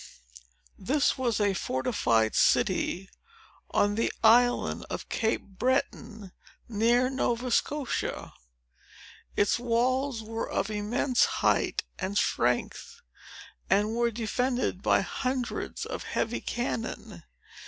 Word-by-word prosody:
This 280 +9 +1
was 245 -5 0
a 205 -1 +2
fortified 115 - 0
city, 190 +2 +2 0.6
on 205 0 +2
the 225 +2 0
Island 245 +2 +4
of - - -6
Cape 225 -1 0
Breton, 220 -2 -2 0.4
near 235 +3 +2
Nova 250 -2 -1
Scotia. 285 +2 -1 1.0
Its 205 +3 +2
walls 245 +1 0
were 225 +1 -4
of 215 - -1
immense 225 +5 +1
height - - +1 0.2
and 195 +2 -2
strength, 120 - -1 0.7
and 210 +2 +2
were 235 0 +2
defended 240 -1 -1
by - - +3
hundreds 255 -1 -3
of - - -5
heavy 230 +1 -2
cannon. 240 -1 -4
230 Hz, 100 wpm, -28 LUFS, 205-250 Hz, 1.0 s, Island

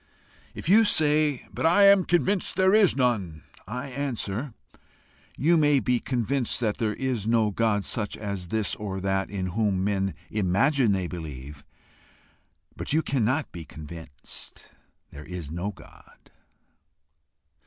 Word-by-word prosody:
If - - -5
you 215 +6 +6
say, 150 - +3
"But - - -4
I 175 +5 +5
am 200 -2 +6
convinced 185 +2 +2
there 190 +1 +3
is 210 -4 +5
none," 105 - -1 0.2
I 125 +6 -5
answer 125 -3 -4 0.8
You 165 +4 +3
may 145 -2 +4
be 125 +1 0
convinced 125 +1 -1
that 110 -4 -1
there 110 -2 -1
is 125 -6 -2
no 115 -2 +2
God 105 -1 0
such 105 -4 -2
as 100 -4 -5
this 110 +2 0
or 100 -2 -5
that 95 0 -1
in 95 -2 -3
whom 100 -3 0
men 95 -1 -1 0.2
imagine 110 +6 +2
they 95 -2 0
believe, 75 -5 -8 1.1
but - - -3
you 160 +1 +2
cannot 130 +3 0
be 85 - -8
convinced 80 0 -10 0.4
there 75 +1 -10
is 90 -5 -7
no 85 +5 -3
God. 105 - -16
110 Hz, 140 wpm, -26 LUFS, 95-140 Hz, 1.1 s, you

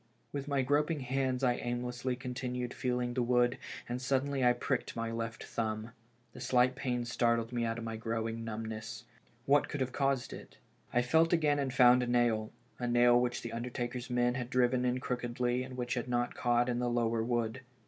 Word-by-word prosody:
With 140 0 -4
my 140 -2 +1
groping 150 +3 +1
hands 130 0 -1
I 125 -1 +3
aimlessly 125 +1 -2
continued 125 -1 -4
feeling 125 -1 -1
the 125 - 0
wood, 120 0 +2 0.3
and 125 +1 -3
suddenly 135 +1 0
I 125 - +6
pricked 125 +1 -2
my 115 0 -2
left 115 0 -4
thumb. 110 0 -3 0.4
The - - -10
slight 125 0 +3
pain 125 -2 -2
startled 115 -1 +1
me 120 -1 0
out 115 0 -1
of 115 - -5
my 115 -1 -4
growing 115 0 -3
numbness. 110 0 -5 0.4
What 145 +1 +3
could 145 - -4
have 130 -1 -1
caused 135 -2 0
it? - - -11 0.3
I 120 - +2
felt 160 +7 +3
again, 150 -3 +3
and 135 -2 -1
found 125 -1 +6
a 125 - -1
nail 120 -3 +2
— - - -33
a 125 - -1
nail 120 0 +5
which 125 0 -1
the 115 - -5
undertaker's 120 +1 -4
men 120 0 +2
had 125 -1 -4
driven 125 0 +2
in 125 0 +1
crookedly 125 0 -1
and 130 0 -7
which 120 -1 -2
had 120 -1 -2
not 120 0 0
caught 120 0 +2
in 120 -1 0
the 125 0 0
lower 115 -1 +1
wood. 120 +1 -1
125 Hz, 200 wpm, -32 LUFS, 120-130 Hz, 0.4 s, I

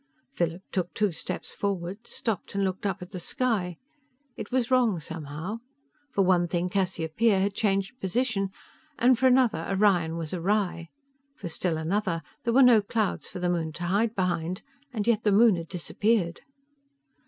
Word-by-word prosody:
Philip 170 -5 -2
took 180 -2 -1
two 210 -2 +2
steps 160 - -5
forward, 200 +2 -3
stopped 215 -4 -4
and 200 - +1
looked 190 +1 -1
up 190 -1 -3
at 180 - -12
the 185 - -5
sky. 200 - -1 0.6
It - - -7
was 255 -1 0
wrong 240 -8 +3
somehow. 160 +6 -6 0.5
For 200 -6 +2
one 180 -2 +3
thing, 175 +1 -1
Cassiopeia 190 +2 +1
had 200 +1 +1
changed 200 +4 0
position, 195 0 0 0.5
and 245 0 +4
for 260 - +5
another, 250 -10 +3
Orion 190 -5 +2
was 165 -1 -4
awry. 180 -2 0 0.5
For 175 - -6
still 165 0 -1
another, 170 0 -1 0.2
there 235 - +1
were 270 - +8
no 240 -4 +7
clouds 215 0 -1
for - - -8
the 180 0 -1
moon 165 -3 -1
to 175 - -6
hide 210 +6 +1
behind, 180 -1 -1 0.3
and 215 -4 -2
yet 230 -2 +3
the 210 - +3
moon 215 0 +6
had 170 -1 -5
disappeared. 180 +1 0
195 Hz, 165 wpm, -27 LUFS, 175-220 Hz, 0.6 s, were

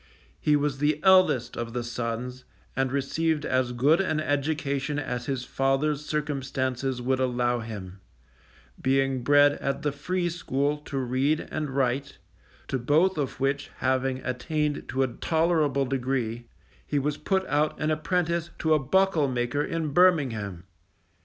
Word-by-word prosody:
He 150 - +3
was 145 -2 0
the 150 +1 +1
eldest 185 -11 +4
of 115 -1 -4
the 120 -1 -2
sons, 120 +2 -4 0.3
and 135 0 0
received 150 +3 0
as 130 -1 +1
good 145 +9 +3
an 155 -5 0
education 145 -1 -1
as 125 -4 -3
his 130 -3 -2
father's 135 +2 0
circumstances 135 -3 -2
would 130 +1 +1
allow 125 -1 +1
him, 100 -4 -7 0.8
being 135 -1 +1
bred 145 +2 +6
at 140 - -2
the 150 - +1
free 175 +5 -2
school 145 -4 -1
to 145 -1 -6
read 135 +4 0
and 155 -2 -2
write, 135 +1 -1 0.5
to 130 - -1
both 155 +8 +2
of 140 - -3
which 135 +1 -1
having 130 0 0
attained 150 +4 -2
to 135 +1 +1
a - - +1
tolerable 155 +1 +1
degree, 125 -3 -2 0.4
he 145 - 0
was 145 +1 0
put 190 -1 0
out 150 +1 0
an 155 +1 0
apprentice 170 +2 0
to 160 -1 +2
a 155 - +4
buckle 165 +1 +2
maker 125 +2 -1
in 160 -1 -2
Birmingham. 130 - +2
140 Hz, 145 wpm, -27 LUFS, 130-150 Hz, 0.8 s, bred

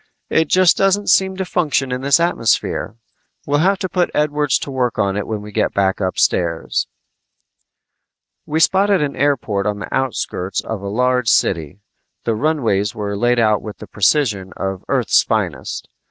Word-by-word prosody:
"It 160 - +3
just 185 +1 +4
doesn't 195 0 +2
seem 190 +1 +2
to 190 - -2
function 145 -7 0
in 125 0 -2
this 140 +4 +3
atmosphere. 165 - 0 0.5
We'll 145 +1 +1
have 195 +5 +3
to 185 - -3
put 180 -1 0
Edwards 150 -1 +1
to 140 - -6
work 125 -3 -1
on 100 -1 0
it 105 - -3
when 110 -2 -4
we 105 - -9
go - - +1
back 95 -1 0
upstairs." 90 -3 0 1.6
We 155 +1 0
spotted 195 +1 +3
an 140 -1 -3
airport 120 -8 0
on 105 -1 -1
the 105 - -7
outskirts 100 -7 -2
of 110 -3 -5
a 100 - -6
large 125 +3 +1
city. 85 -1 0 0.4
The 115 - 0
runways 110 -6 0
were 100 -2 -3
laid 120 +4 +1
out 110 -2 +2
with 105 -2 -8
the - - -10
precision 105 -4 0
of 95 -1 -4
Earth's - - +3
finest. - - -3
125 Hz, 170 wpm, -19 LUFS, 100-150 Hz, 1.6 s, just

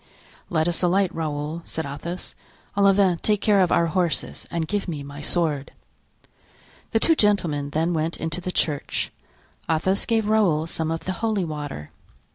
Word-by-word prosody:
"Let 160 -1 +2
us 175 - +1
alight; 185 +1 +2
Raoul," 155 0 -3
said 160 -1 -4
Athos. 170 +6 -6 0.4
"Olivain, 195 -3 +4
take 210 -1 +2
care 205 -1 +4
of 180 - +3
our 170 - +4
horses 170 0 0
and 165 -2 -2
give 205 +3 -1
me 150 -5 -4
my 140 +1 -8
sword." 150 -3 0 1.2
The 225 - +2
two 325 - +4
gentlemen 170 - +2
then 165 +4 0
went 160 +1 -1
into 165 +2 -3
the 185 - -3
church. 150 -5 -1 0.6
Athos 175 +5 +1
gave 225 -3 +2
Raoul 195 -8 +3
some 160 -1 -2
of 165 0 -2
the 185 - -3
holy 215 -5 +1
water. 145 - -6
170 Hz, 160 wpm, -24 LUFS, 155-195 Hz, 1.2 s, Olivain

